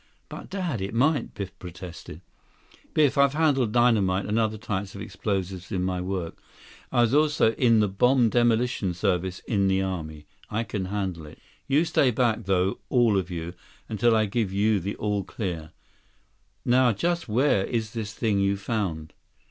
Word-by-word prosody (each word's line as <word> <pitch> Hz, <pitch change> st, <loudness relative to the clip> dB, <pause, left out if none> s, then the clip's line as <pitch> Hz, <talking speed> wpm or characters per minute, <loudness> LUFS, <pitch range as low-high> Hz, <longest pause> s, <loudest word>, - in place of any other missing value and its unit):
"But, -, -, -9 dB
Dad, 180 Hz, -, -3 dB
it 100 Hz, +3 st, -4 dB
might," 140 Hz, +6 st, +1 dB
Biff 100 Hz, -1 st, -7 dB
protested. 90 Hz, -2 st, -9 dB, 0.7 s
"Biff, 145 Hz, -3 st, +3 dB
I've 140 Hz, 0 st, +4 dB
handled 140 Hz, -8 st, +2 dB
dynamite 105 Hz, -6 st, +3 dB
and 105 Hz, +3 st, 0 dB
other 110 Hz, -1 st, 0 dB
types 100 Hz, -2 st, -4 dB
of 100 Hz, -, -7 dB
explosives 95 Hz, -2 st, -4 dB
in 95 Hz, -3 st, -1 dB
my 90 Hz, -1 st, -1 dB
work. 90 Hz, -2 st, -4 dB, 0.5 s
I 120 Hz, -, +3 dB
was 120 Hz, +1 st, +2 dB
also 150 Hz, -6 st, +3 dB
in 115 Hz, -2 st, +3 dB
the 105 Hz, -, +2 dB
bomb 120 Hz, +5 st, +3 dB
demolition 120 Hz, -5 st, +1 dB
service 95 Hz, -1 st, -1 dB
in 100 Hz, -4 st, 0 dB
the 95 Hz, 0 st, +2 dB
army. 80 Hz, -5 st, -5 dB, 0.2 s
I 110 Hz, +2 st, -1 dB
can 100 Hz, -4 st, -4 dB
handle 95 Hz, -5 st, -3 dB
it. 75 Hz, -, -13 dB, 0.3 s
You 145 Hz, +5 st, +3 dB
stay 140 Hz, -5 st, +3 dB
back, 115 Hz, -2 st, 0 dB
though, 95 Hz, 0 st, +1 dB
all 120 Hz, -4 st, +3 dB
of 95 Hz, -1 st, -1 dB
you, 85 Hz, -1 st, -5 dB, 0.3 s
until 115 Hz, +1 st, +2 dB
I 110 Hz, -1 st, +3 dB
give 105 Hz, -1 st, -1 dB
you 100 Hz, +1 st, +2 dB
an 100 Hz, +4 st, -4 dB
all 105 Hz, -2 st, -1 dB
clear. 85 Hz, -5 st, -5 dB, 1.0 s
Now 125 Hz, -1 st, +4 dB
just 170 Hz, -, -1 dB
where 115 Hz, -3 st, +2 dB
is 110 Hz, -2 st, -2 dB
this 110 Hz, -2 st, -4 dB
thing 110 Hz, -3 st, 0 dB
you 100 Hz, 0 st, +1 dB
found?" 95 Hz, -8 st, -3 dB
105 Hz, 170 wpm, -26 LUFS, 95-120 Hz, 1.0 s, I've